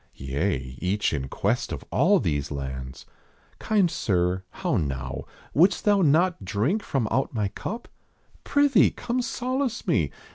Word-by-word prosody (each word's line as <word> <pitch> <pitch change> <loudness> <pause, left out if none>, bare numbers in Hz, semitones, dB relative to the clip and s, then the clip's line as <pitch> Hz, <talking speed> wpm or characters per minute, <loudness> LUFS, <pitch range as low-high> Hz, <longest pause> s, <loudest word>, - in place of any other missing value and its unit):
Yea, 65 -1 -2
each 100 +2 0
in 65 -3 -2
quest - - -1
of - - -5
all - - +4
these 70 -1 -1
lands. 65 -2 -6 0.5
Kind 205 -6 +2
sir. 90 -1 0
How - - -2
now; 65 -3 -3 0.3
wouldst 180 +5 +3
thou 205 -2 +4
not 170 - +3
drink 110 - 0
from 135 - -1
out 135 +1 0
my 105 -3 0
cup? 225 - -6 0.6
Prithee, 285 -6 +4
come 250 +1 -2
solace 255 0 -2
me! - - +2
105 Hz, 140 wpm, -26 LUFS, -, 0.6 s, all